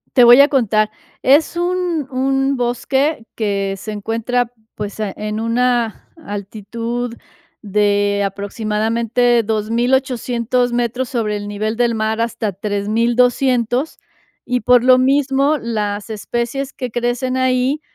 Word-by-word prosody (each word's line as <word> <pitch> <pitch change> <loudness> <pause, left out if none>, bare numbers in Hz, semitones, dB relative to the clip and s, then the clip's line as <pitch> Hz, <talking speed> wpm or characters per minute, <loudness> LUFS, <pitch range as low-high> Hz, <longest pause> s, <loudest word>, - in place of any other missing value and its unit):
Te 250 - +7
voy 240 +3 +9
a 285 - +6
contar, 215 -6 +2 0.3
es 290 +6 +3
un 350 -4 -1
un 270 +1 0
bosque 250 +2 0
que 200 -3 -1
se 215 +3 -7
encuentra, 230 +3 -1 0.2
pues, 210 0 -6
eh, 205 -3 -2
en 215 +1 -3
una 235 0 0
altitud 230 +1 -5 0.5
de 205 -1 +1
aproximadamente, 225 +4 0
2800 240 +2 0
metros 245 +1 -1
sobre 220 -4 -1
el 205 0 -5
nivel 215 +2 -2
del 240 -1 +1
mar 220 +1 -1
hasta 225 -3 -2
3200, 235 - +1 0.5
y 250 -1 -1
por 245 +1 +4
lo 255 0 +6
mismo 275 +2 +2
las 210 -3 -3
especies 240 +5 -3
que 250 -2 -5
crecen 245 +2 -1
ahí 260 +3 +1
235 Hz, 120 wpm, -18 LUFS, 215-255 Hz, 0.5 s, voy